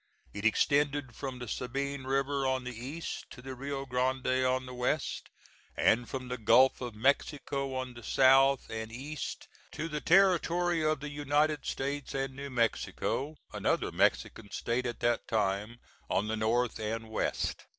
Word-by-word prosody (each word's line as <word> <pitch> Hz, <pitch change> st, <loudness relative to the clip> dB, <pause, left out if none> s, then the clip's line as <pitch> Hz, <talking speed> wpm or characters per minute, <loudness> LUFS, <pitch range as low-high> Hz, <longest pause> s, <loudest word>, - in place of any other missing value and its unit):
It 100 Hz, +1 st, -5 dB
extended 140 Hz, +3 st, +2 dB
from 135 Hz, -2 st, -5 dB
the 125 Hz, -1 st, -7 dB
Sabine 135 Hz, +4 st, -3 dB
River 135 Hz, +1 st, 0 dB
on 130 Hz, -1 st, 0 dB
the 125 Hz, -1 st, -6 dB
east 135 Hz, +8 st, -6 dB
to -, -, -11 dB
the 130 Hz, +1 st, -7 dB
Rio 135 Hz, +1 st, -4 dB
Grande 130 Hz, 0 st, +1 dB
on 130 Hz, 0 st, +1 dB
the 125 Hz, -, -8 dB
west, 125 Hz, +4 st, -1 dB, 0.5 s
and 120 Hz, +2 st, +3 dB
from 130 Hz, -1 st, -4 dB
the 125 Hz, -1 st, -4 dB
Gulf 115 Hz, +5 st, +5 dB
of 120 Hz, -3 st, -5 dB
Mexico 140 Hz, +2 st, 0 dB
on 130 Hz, -1 st, -3 dB
the 120 Hz, -, -11 dB
south 135 Hz, +3 st, +5 dB
and 110 Hz, 0 st, -4 dB
east 140 Hz, +5 st, -6 dB, 0.3 s
to 160 Hz, -, -3 dB
the 150 Hz, -2 st, -4 dB
territory 175 Hz, -2 st, +3 dB
of 155 Hz, -2 st, +1 dB
the 150 Hz, 0 st, -5 dB
United 145 Hz, +1 st, +1 dB
States 140 Hz, +1 st, -3 dB
and 135 Hz, 0 st, -2 dB
New 140 Hz, +1 st, -6 dB
Mexico 130 Hz, +4 st, -1 dB, 0.2 s
another -, -, 0 dB
Mexican 105 Hz, -3 st, +1 dB
state 120 Hz, +4 st, -1 dB
at 120 Hz, -, -5 dB
that 120 Hz, -1 st, +1 dB
time 105 Hz, +1 st, 0 dB, 0.3 s
on 105 Hz, -, +1 dB
the 110 Hz, -, -1 dB
north 115 Hz, +2 st, +1 dB
and 110 Hz, +1 st, -3 dB
west. 110 Hz, -, -2 dB
130 Hz, 160 wpm, -31 LUFS, 120-140 Hz, 0.5 s, Gulf